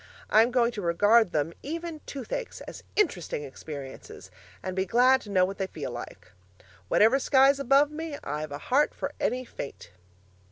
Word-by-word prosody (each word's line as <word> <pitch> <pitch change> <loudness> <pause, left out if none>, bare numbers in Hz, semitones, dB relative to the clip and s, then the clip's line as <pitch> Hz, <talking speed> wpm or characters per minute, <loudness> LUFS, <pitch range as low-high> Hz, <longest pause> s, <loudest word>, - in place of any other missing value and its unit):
I'm 225 +2 +6
going 245 -1 +2
to 215 - -6
regard 205 +4 +4
them 155 +2 -1
(even 330 +1 -5
toothaches) 280 - -5
as - - -9
interesting 190 - 0
experiences, 140 -1 -9 0.3
and 185 -1 -4
be 190 - +1
glad 250 +6 +4
to 210 - -12
know 185 -2 +3
what 195 +2 -6
they 190 - -1
feel - - -6
like. - - -9 0.6
'Whatever 225 +6 +4
sky's 270 +1 +4
above 275 +2 +4
me, 310 -1 -5
I've 150 +1 -4
a 145 - -4
heart 270 - +1
for - - -4
any 255 +1 -1
fate.' 140 - -8
235 Hz, 165 wpm, -27 LUFS, 180-275 Hz, 0.6 s, I'm